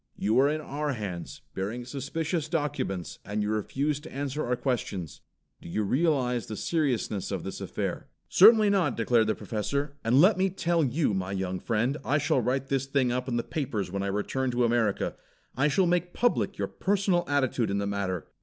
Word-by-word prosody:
"You 110 +5 +2
are 140 +2 +5
in 155 +1 -1
our 150 0 -2
hands, 100 -7 -6
bearing 110 +6 -4
suspicious 155 +4 -3
documents, 145 - -2
and 105 +1 -2
you 105 - -1
refuse 140 +7 -1
to 160 +2 -11
answer 140 +2 -3
our 125 +1 0
questions. 100 - -3 0.4
Do - - -10
you 105 +5 -1
realize 125 - +1
the 110 - -5
seriousness 130 - -1
of - - -3
this - - -6
affair?" - - -3 0.2
"Certainly 215 +1 +7
not!" 180 -10 +1
declared 115 -1 +3
the 110 - +1
Professor, 140 +6 -3
"and 120 +4 +4
let 185 +5 +6
me 190 +1 +3
tell 170 -3 +1
you, 140 -2 +1
my 95 0 -2
young 95 -1 -2
friend, 120 +7 0
I 145 - +2
shall 145 -3 +2
write 135 +3 -1
this 135 -1 0
thing 135 -3 +1
up 125 +1 -2
in 120 -2 -1
the 120 - 0
papers 110 - -3
when 100 0 -2
I 100 - -1
return 105 +6 -1
to 125 0 +1
America. 115 -3 +1 0.4
I 135 +4 +3
shall 180 +6 +3
make 175 0 0
public 240 -4 +1
your - - -1
personal 195 -3 +1
attitude 130 -5 +1
in 100 - 0
the 100 - -1
matter. 100 -4 -2
130 Hz, 195 wpm, -28 LUFS, 105-150 Hz, 0.4 s, Certainly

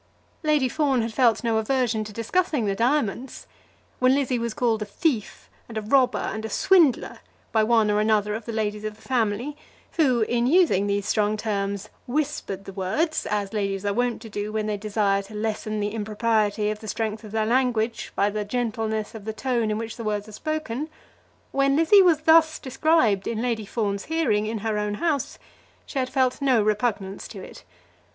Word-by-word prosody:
Lady 300 -4 +2
Fawn 270 -2 +1
had 225 0 -4
felt 240 -2 +3
no 230 -1 +1
aversion 230 -1 0
to 215 - -8
discussing 240 - 0
the 200 - +1
diamonds. 245 +1 -1 0.5
When 255 +1 +4
Lizzie 260 -3 0
was 230 -1 -3
called 230 -3 +1
a - - -1
"thief," 230 - -2 0.2
and 225 - -6
a - - -1
"robber," 255 +3 +3
and 220 - -3
a 220 - -4
"swindler" 330 - +3 0.3
by 220 -1 +3
one 220 -1 +3
or 210 - +2
another 210 -1 +2
of 220 0 -5
the 230 - -4
ladies 210 -1 -2
of 215 0 -4
the 220 - -19
family, 240 +2 0 0.4
who, 260 -7 +3
in 235 +2 +1
using 295 - +4
those 200 0 0
strong 215 0 +1
terms, 200 -1 -2 0.2
whispered 260 -8 -2
the 195 - -8
words 205 - -1
as 205 -1 -2
ladies 195 -2 -2
are 200 - +1
wont 245 +1 -1
to 225 - -9
do 205 +1 -3
when 215 0 -1
they 215 -1 -1
desire 205 -1 0
to 200 +2 -12
lessen 215 0 -2
the 205 0 -2
impropriety 215 -1 0
of 210 - -5
the 220 - -10
strength 220 +1 -3
of 215 - -10
their 220 0 0
language 235 -1 0
by 200 +1 +2
the 210 0 -2
gentleness 220 -1 -2
of 220 -3 -9
the 220 - -3
tone 235 -1 -1
in 210 - -1
which 225 0 -5
the 230 - -6
words 210 -1 -2
are - - -11
spoken, 310 +2 -3 0.6
when 275 0 +2
Lizzie 330 +6 +6
was 335 -5 +4
thus 320 0 +5
described 260 - +2
in 225 - -2
Lady 225 -3 -2
Fawn's 200 -3 -2
hearing 300 -11 +1
in 225 +1 -2
her 215 -1 0
own 210 0 -2
house, 295 +1 -1 0.5
she 275 - -4
had 255 -1 -1
felt 260 -1 +1
no 265 -4 +3
repugnance 210 -2 -1
to - - -9
it. - - -12
220 Hz, 195 wpm, -24 LUFS, 210-255 Hz, 0.6 s, Lizzie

